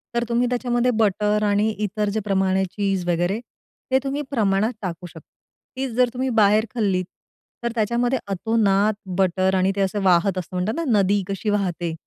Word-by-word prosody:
तर 235 - +1
तुम्ही 240 +1 +2
त्याच्यामध्ये 245 0 +1
बटर 210 0 +2
आणि 205 +1 +2
इतर 210 0 -1
जे 210 +2 -1
प्रमाण 190 -2 +1
आहे 190 0 +2
चीज 195 -3 -1
वगैरे. 175 +4 0 0.5
ते 265 - +4
तुम्ही 280 +1 -2
प्रमाणात 215 -2 +1
टाकू 180 -2 -5
शकता. - - -12 0.6
तीच 265 -1 -2
जर 250 0 +3
तुम्ही 260 +1 -1
बाहेर 215 -2 +4
खाल्लीत, 195 -6 0 0.6
तर 235 - -1
त्याच्यामध्ये 240 +3 +1
अतोनात 205 +1 +1 0.3
बटर 190 0 +2
आणि 190 +1 +2
ते 200 - 0
असं 195 +1 0
वाहत 185 +1 +3
असतं 185 0 -5
म्हणतात 180 +4 -1
ना, 335 - -2 0.2
नदी 200 +1 +2
कशी 195 +2 -2
वाहते. 180 -5 -1
205 Hz, 175 wpm, -22 LUFS, 190-230 Hz, 0.6 s, ते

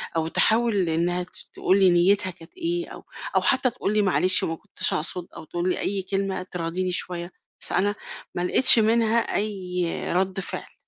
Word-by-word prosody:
أو 160 -1 0
تحاول 220 -1 +2
إنها 175 +2 0
ت 180 - -14 0.2
تقول 190 +2 +1
لي 190 -1 +5
نيتها 185 +2 +3
كانت 165 - -16
إيه، 345 0 -2
أو - - -11 0.3
أو - - +4
حتى 260 -1 +2
تقول 225 -4 -3
لي 215 - +3
معلش 185 -1 +3
ما 165 - -2
كنتش - - -1
أقصد 175 +3 -3
أو - - -9
تقول 175 +3 -3
لي - - -1
أي 195 0 -1
كلمة 195 -1 -3
تراضيني 180 0 -3
شوية، 175 0 0 0.3
بس - - +2
أنا 205 +2 +1 0.4
ما - - -2
لقتش 230 +7 +6
منها 225 +1 +2 0.2
أي 185 -4 -2 0.3
رد 190 +1 0
فعل 195 - -6
185 Hz, 180 wpm, -24 LUFS, 175-210 Hz, 0.4 s, لقتش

